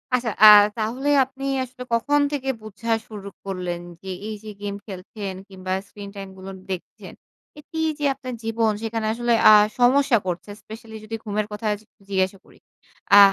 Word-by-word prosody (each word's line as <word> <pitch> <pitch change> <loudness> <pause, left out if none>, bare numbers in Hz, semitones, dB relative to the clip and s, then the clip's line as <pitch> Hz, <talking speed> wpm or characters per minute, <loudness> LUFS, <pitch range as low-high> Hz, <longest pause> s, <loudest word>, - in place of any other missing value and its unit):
আচ্ছা, 240 -3 -1
আ - - +12 0.3
তাহলে 245 +6 -1 0.2
আপনি 270 +1 -9 0.2
আসলে 250 0 -9
কখন 290 +6 +3
থেকে 270 -2 -2
বুঝা 215 +2 -5 0.2
শুরু 205 -3 -8 0.2
করলেন 180 -3 -3 0.2
যে, 190 - -7 0.2
এই 215 - -4
যে 215 - -8
গেম 200 -1 -3
খেলছেন 195 0 -6 0.2
কিংবা 185 -1 -4
স্ক্রিন 200 -1 -9
টাইম 195 -1 -7
গুলোন 190 0 -8 0.2
দেখছেন, 180 - -7 0.5
এটি 320 +2 -7 0.2
যে 290 - -1
আপনার 255 -2 -7
জীবন 225 0 +1
সেখানে 225 -1 -2
আসলে 240 0 +1 0.2
আ - - +10 0.3
সমস্যা 255 0 +5
করছে। 180 +3 -3
স্পেশালি 220 +1 -11
যদি 225 +1 -5
ঘুমের 210 -1 -1
কথা 210 +2 -6
য - - +2 0.4
জিজ্ঞাসা 190 0 0
করি? - - -20 0.6
আ - - +12
220 Hz, 165 wpm, -23 LUFS, 195-245 Hz, 0.6 s, আ